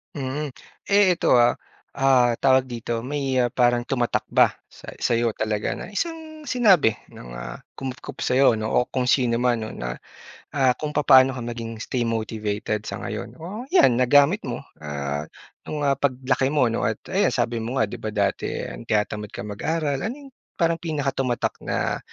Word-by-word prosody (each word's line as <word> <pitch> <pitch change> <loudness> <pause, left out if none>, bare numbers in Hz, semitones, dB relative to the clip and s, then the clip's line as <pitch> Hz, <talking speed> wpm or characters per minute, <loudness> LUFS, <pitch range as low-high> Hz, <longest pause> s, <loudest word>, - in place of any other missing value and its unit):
Mm. 145 +2 -3 0.4
Eh, 200 -2 +5
ito - - +4
ah, 120 0 +4 0.3
ah, 130 -3 +4
tawag 130 0 +4
dito, 115 0 -3
may 135 0 -2 0.2
parang 120 -1 +2
tumatak 120 -2 0
ba - - +6 0.2
sa - - -15
sa'yo 115 -1 0
talaga 110 -1 -1
na 180 - -8
isang 315 +3 -5
sinabi 195 - +4 0.2
ng, - - -10
ah, - - -7 0.2
kumupkop 130 -1 -6
sa'yo 125 -1 +4
'no, 110 0 -3
o 125 - +2
kung 130 - -1
sino 120 -3 +3
man 120 -1 +1
no 110 - -6
na - - -5 0.6
ah, 130 -3 +4
kung 150 -1 -4
papaano 135 -3 +6
ka 125 - -5
maging 115 -1 -5
stay 120 -2 -1
motivated 110 -1 -2
sa - - -5
ngayon? 115 +1 -5
O, 205 - -7
yan, 125 - +5
nagamit 145 - +5
mo 120 - -4 0.2
ah, 75 0 -4 0.4
nung, 150 -1 -3
ah, 140 -1 +1
paglaki 130 -1 +1
mo 135 -5 +2
'no - - 0
at - - 0 0.2
ayan - - +3
sabi 115 0 0
mo 115 +4 -4
nga 120 - +3
'di - - -6
ba - - -5
dati, 100 -2 0 0.4
tinatamad 105 -1 -1
ka - - -5
mag-aral, 140 +7 -2
ano 230 - -3
'yong 280 -2 -13 0.2
parang 165 0 +1
pinakatumatak 135 -6 -1
na - - -2
125 Hz, 170 wpm, -24 LUFS, 115-145 Hz, 0.6 s, ba